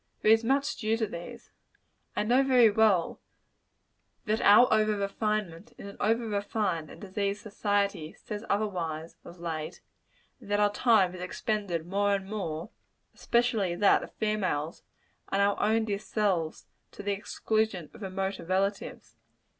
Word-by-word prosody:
There 215 - +5
is 225 +1 +5
much 275 +4 +1
due 220 0 0
to 225 - 0
these. 175 -4 -9 0.6
I - - +1
know, 245 +5 +4
very 250 -5 +5
well, 205 -5 +2 1.1
that 215 +1 0
out 210 +5 +7
over 215 -1 +3
refinement, 200 -1 -2
in - - -10
an 200 - -9
over 225 +2 +1
refined 200 -6 -2
and - - -12
diseased 200 +1 -3
society, 200 -6 -1
says 210 0 -7
otherwise, 170 -6 -2
of 175 0 -12
late; 160 -1 -5 0.6
and - - -14
that 205 0 +1
our 205 0 +3
time 210 -6 +3
is 180 - -8
expended 185 -3 -2
more 200 +2 +1
and 190 -1 -5
more 190 -3 -4 0.4
especially 230 -7 +1
that 200 +3 +4
of - - -9
females 185 -8 -1 0.5
on 195 - 0
our 200 0 +3
own 220 +1 +2
dear 200 -2 -2
selves 195 -7 -1 0.3
to - - -9
the 205 - -1
exclusion 215 -3 -2
of - - -14
remoter 190 0 -3
relatives. 195 +3 -2
205 Hz, 150 wpm, -29 LUFS, 185-215 Hz, 1.1 s, out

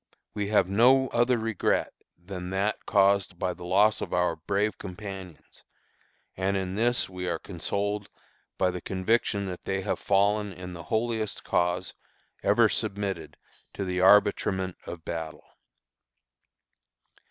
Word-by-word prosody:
We 105 -1 -2
have 105 -3 +3
no 125 +7 +4
other 120 +1 +2
regret 115 -3 0 0.2
than 90 0 -7
that 100 +3 -1
caused 100 -3 +3
by 90 0 -1
the 90 0 -10
loss 100 +4 +3
of - - -4
our 90 0 +2
brave 100 +6 -1
companions; 95 -3 -9 0.7
and 95 +1 0
in 95 -1 -3
this 120 +4 +1
we 90 -1 -6
are 85 - -1
consoled 100 +4 -3 0.5
by 95 -1 +2
the 90 0 -6
conviction 100 +1 0
that 90 -2 -6
they 95 0 -2
have - - -2
fallen 100 +1 +2
in 90 0 -8
the 85 - -8
holiest 110 -1 -1
cause 90 0 0 0.5
ever - - +4
submitted 100 -2 -3 0.4
to 100 - -3
the 90 0 -2
arbitrament 95 -1 +4
of 85 -2 -8
battle." 80 -2 -5
95 Hz, 135 wpm, -27 LUFS, 90-105 Hz, 0.7 s, no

